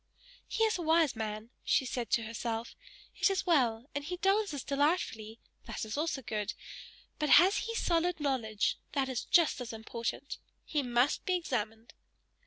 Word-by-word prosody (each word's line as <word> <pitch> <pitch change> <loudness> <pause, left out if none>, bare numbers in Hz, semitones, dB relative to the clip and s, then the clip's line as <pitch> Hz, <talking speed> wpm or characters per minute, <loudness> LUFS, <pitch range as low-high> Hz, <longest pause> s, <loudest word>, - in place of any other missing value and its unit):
"He 450 - 0
is 440 -3 +2
a - - -2
wise 320 -4 +3
man," 215 +1 -5
said 250 -3 0
she - - +6
to 230 - -2
herself 230 +1 -4 0.4
"It - - +4
is 390 -1 -1
well; 245 -9 +2
and 285 - -3
he 360 +5 -4
dances 390 -7 +1
delightfully 275 -7 0 0.3
that - - -4
is 215 - -5
also 295 -3 -1
good; 210 -2 -3 0.6
but 300 -1 0
has 380 +4 +7
he 455 +2 -3
solid 345 -3 +1
knowledge? 235 -7 0
That 270 -2 0
is 255 -2 -3
just 330 -6 +3
as 245 - -5
important! 230 +4 -5 0.3
He 300 - 0
must 245 +1 +1
be 370 - +3
examined." 225 -9 -3
270 Hz, 165 wpm, -32 LUFS, 225-335 Hz, 0.6 s, has